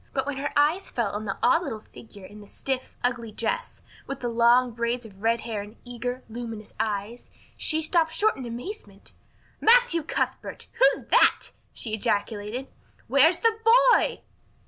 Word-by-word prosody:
But 265 -1 -1
when 285 -1 -4
her 280 +1 -3
eyes 305 +7 +2
fell 235 -5 -1
on 210 +1 -5
the 195 - -3
odd 335 0 +4
little 225 -10 -6
figure 205 -4 -13
in 210 +2 -12
the 205 - -14
stiff, 260 +4 -4
ugly 240 -2 -1
dress, 485 - -4 0.2
with 275 0 -5
the 240 - -2
long 240 +2 +4
braids 235 +1 -2
of 200 -3 -14
red 230 +1 +1
hair 220 -3 -4
and 205 +1 -10
the - - -28
eager, 245 +1 -5
luminous 225 -2 -7
eyes, 215 +2 -3 0.3
she 315 0 +1
stopped 325 0 +2
short 435 +5 +1
in 265 - -8
amazement. 250 - -8 0.5
"Matthew 465 -7 +5
Cuthbert, 300 - -4
who's - - +3
that?" - - +4 0.2
she 220 - -4
ejaculated. 210 +3 -1 0.4
"Where 280 +4 +6
is 340 - -3
the 455 -1 +3 0.4
boy?" - - +1
245 Hz, 170 wpm, -25 LUFS, 220-310 Hz, 0.5 s, Where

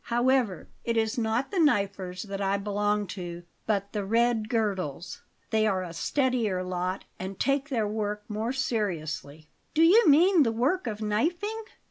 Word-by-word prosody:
However, 240 -4 +1 0.2
it 230 -1 -1
is 220 0 +1
not 230 - 0
the 390 - 0
'Knifers' 200 - +1
that 200 -1 -5
I 195 0 +1
belong 205 +1 0
to, 175 -2 -7 0.2
but 200 -2 -1
the 210 -2 -1
'Red 225 +1 +1
Girdles.' 190 - -2 0.3
They 220 0 +3
are 190 -3 0
a 170 -2 -7
steadier 230 - 0
lot, 185 +1 -3
and 190 +1 -6
take 275 +1 +1
their 225 -6 0
work 210 0 -3
more 220 +2 -2
seriously." 160 - -3 0.3
"Do 320 - +5
you 390 +5 +6
mean 340 +4 +6
the 235 -5 +3
work 260 +9 0
of 215 -1 -4
knifing?" 350 - -1
215 Hz, 160 wpm, -27 LUFS, 195-255 Hz, 0.3 s, you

